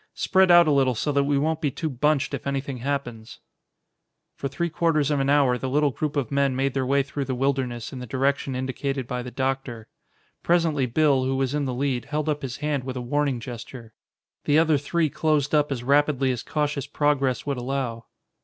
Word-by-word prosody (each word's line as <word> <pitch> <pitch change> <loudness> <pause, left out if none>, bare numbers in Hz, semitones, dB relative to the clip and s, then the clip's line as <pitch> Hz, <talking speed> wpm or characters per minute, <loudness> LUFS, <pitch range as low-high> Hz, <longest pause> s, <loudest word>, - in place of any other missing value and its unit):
Spread 190 -1 +3
out 175 -1 +7
a - - +3
little 135 -3 +3
so 145 +7 -1
that 140 0 +2
we 145 0 +1
won't 160 +3 0
be 150 - +1
too 160 +4 -4
bunched 150 +1 0
if - - -4
anything 140 -1 -3
happens." 120 -4 -4 0.9
For 140 - -4
three 170 +6 -2
quarters 155 -3 +1
of 145 - +1
an 135 0 0
hour 135 -4 +3
the 130 - -3
little 145 +1 +2
group 150 +3 -3
of 135 -6 -1
men 140 -1 +1
made 135 0 0
their 130 -2 -1
way 140 +1 +3
through 140 0 -4
the 130 -1 -2
wilderness 130 -3 -2
in 130 - -6
the 125 - -7
direction 135 +2 0
indicated 130 +1 -3
by 125 0 -3
the 125 - -7
doctor. 130 -3 -3 0.5
Presently 165 -6 +2
Bill, 135 0 +2
who 135 +1 0
was 135 0 -1
in 145 -1 0
the 130 -2 -3
lead, 130 -3 -1
held 155 0 -2
up 150 -1 -1
his 130 -2 -5
hand 150 -3 -2
with 130 0 -5
a - - -2
warning 140 +1 0
gesture. 120 -1 -9 0.5
The 145 - +3
other 160 -2 +4
three 160 +3 0
closed 150 -2 0
up 150 -1 +2
as 125 -3 -3
rapidly 140 0 +2
as 120 -2 -3
cautious 145 -2 -2
progress 140 -3 0
would 140 -2 -2
allow. 125 -2 -3
140 Hz, 210 wpm, -24 LUFS, 130-145 Hz, 0.9 s, out